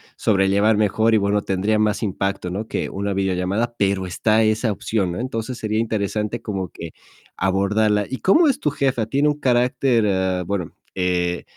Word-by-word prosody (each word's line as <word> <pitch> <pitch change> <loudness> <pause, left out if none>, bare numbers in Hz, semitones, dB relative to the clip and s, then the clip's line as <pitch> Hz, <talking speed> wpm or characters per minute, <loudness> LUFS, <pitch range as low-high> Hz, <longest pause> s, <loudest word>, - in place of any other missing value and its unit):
sobrellevar 100 +1 +2
mejor 110 +2 +2
y - - +5
bueno, 100 0 +1
tendría 100 +3 0
más 110 +1 +1
impacto, 95 -2 -2
¿no?, 105 +5 -4
que - - -3
una 100 0 -3
videollamada, 95 +5 -1
pero 95 -1 0
está 110 +5 +2
esa 110 +1 +1
opción, 100 -3 -1
¿no? 90 - -5
Entonces, 120 -1 -4
sería 110 0 -2
interesante 110 0 -2
como 95 -5 -4
que 85 -1 -9 0.5
abordarla. 105 +2 +1
Y 130 - -3
¿cómo 315 - +4
es 270 - +1
tu 150 - 0
jefa? 130 -6 0
¿Tiene 140 +2 +1
un 150 0 0
carácter, 125 -2 +2
eh, 95 -1 0
bueno, 95 -4 -3 0.2
eh, 90 -1 0
105 Hz, 170 wpm, -21 LUFS, 95-115 Hz, 0.5 s, y